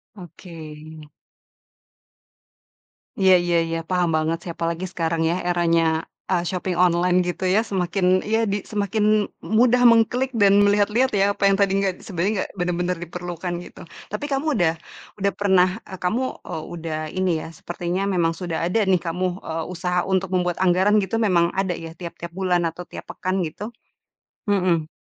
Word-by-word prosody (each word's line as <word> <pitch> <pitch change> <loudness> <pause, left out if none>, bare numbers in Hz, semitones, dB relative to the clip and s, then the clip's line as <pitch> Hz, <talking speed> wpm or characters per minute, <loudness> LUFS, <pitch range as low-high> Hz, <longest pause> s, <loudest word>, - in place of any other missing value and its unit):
Oke. 165 -4 -11 2.3
Iya 190 -1 +6
iya 175 0 +1
iya. 165 0 -2
Paham 180 -2 +1
banget 155 +1 0
sih, 175 - -5
apalagi 170 +2 -2
sekarang 165 -2 -1
ya, 170 - +1
eranya, 170 -1 +2 0.5
eee, 175 -2 +2
shopping 180 0 -2
online 180 0 +3
gitu 180 +1 -3
ya. 190 +4 +4
Semakin 185 0 -1 0.2
iya 225 +1 +1
di 205 0 -2
semakin 205 0 -1 0.4
mudah 245 +3 +3
mengklik 245 +3 +2
dan 205 -5 +4
melihat-lihat 210 +5 +3
ya, 195 - +4
apa - - -5
yang 195 0 +3
tadi 200 -1 +3
nggak 195 -1 +1
sebenarnya 190 +2 -1
nggak - - -16
benar-benar 180 0 -1
diperlukan, 175 +1 -5
gitu. - - -13 0.3
Tapi 290 - -3
kamu 275 +2 0
udah 175 -6 +2 0.5
udah 200 0 +1
pernah 190 -3 +4 0.2
eee, 190 - -10
kamu, 215 +9 0 0.2
eee, 160 - -5
udah 165 -2 -4
ini 185 -1 0
ya, - - -7
sepertinya 175 +3 -4
memang 175 -4 +1
sudah 165 -1 -4
ada 180 +6 +1
nih 185 -3 +3
kamu, 180 +3 0 0.2
eee, 160 0 -3
usaha 180 0 -1
untuk 190 -1 0
membuat 180 -1 0
anggaran 190 +3 +3
gitu 190 +4 -3
memang 170 -2 +3
ada 190 -2 -1
ya, 165 0 -8
tiap-tiap 170 -1 -7
bulan 180 -1 0
atau 170 +2 -4
tiap - - -9
pekan 185 -1 -2
gitu? 205 +8 -6 0.8
Mhm. 180 -6 +1
180 Hz, 160 wpm, -23 LUFS, 170-195 Hz, 2.3 s, Iya